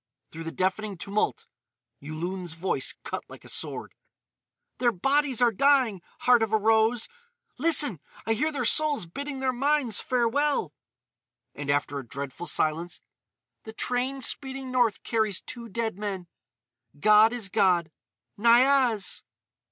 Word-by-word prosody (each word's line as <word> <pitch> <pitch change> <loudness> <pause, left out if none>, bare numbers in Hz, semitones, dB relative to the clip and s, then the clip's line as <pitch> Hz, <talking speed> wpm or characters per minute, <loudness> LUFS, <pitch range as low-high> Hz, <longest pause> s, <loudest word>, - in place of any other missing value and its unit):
Through 165 +1 -8
the 165 - -4
deafening 190 +3 -2
tumult 200 +4 -2 0.5
Yulun's 170 +4 -5
voice 170 +4 -2
cut - - -5
like - - -13
a - - -10
sword: - - -3 0.9
"Their 245 -1 +3
bodies 270 +4 +1
are 240 - +5
dying, 255 -5 +3 0.2
Heart 245 -2 +5
of 220 -1 0
a 220 - +4
Rose!... 220 +2 +2 0.5
Listen! 295 - +3 0.3
I 225 - +2
hear 300 +8 0
their 265 -5 -2
souls 295 - +3
bidding 275 - -6
their 260 -1 +1
minds 270 -3 +1
farewell!" 255 +4 0 0.8
And, 145 -1 -7
after 145 0 0
a - - -7
dreadful 140 +5 -6
silence: 165 +3 -1 0.6
"The 220 - -10
train 255 +4 -2
speeding 265 +1 -1
north 245 -4 +1
carries 220 -4 0
two 235 -2 -9
dead 220 -1 -3
men! 195 -4 -4 0.7
God 215 +4 +6
is 235 -5 -1
God. 180 -5 +2 0.5
Niaz!" 240 -1 +3
225 Hz, 135 wpm, -27 LUFS, 185-260 Hz, 0.9 s, God